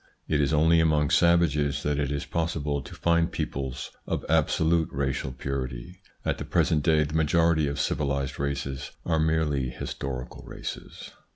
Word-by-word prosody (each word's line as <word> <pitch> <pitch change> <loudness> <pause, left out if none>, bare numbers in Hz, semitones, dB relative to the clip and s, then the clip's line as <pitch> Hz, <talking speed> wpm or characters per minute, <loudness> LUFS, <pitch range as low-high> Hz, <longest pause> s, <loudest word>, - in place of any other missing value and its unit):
It 75 -2 +2
is 70 - +1
only 80 +2 +4
among 75 -2 +3
savages 85 -5 +3
that 75 0 0
it 70 -1 -1
is 70 -1 -2
possible 75 -4 -1
to - - -11
find 85 0 +2
peoples 65 -2 -4 0.2
of - - -2
absolute 80 +1 +2
racial 65 -1 -2
purity. 65 +4 -5 0.2
At - - 0
the - - -3
present 75 - +2
day 80 0 +3
the 75 0 -5
majority 80 0 +3
of 70 0 -3
civilised 70 -2 -1
races 70 -1 -3 0.2
are 80 -2 +1
merely 80 -4 +1
historical 65 -1 -6
races. - - -8
75 Hz, 155 wpm, -27 LUFS, 70-80 Hz, 0.2 s, only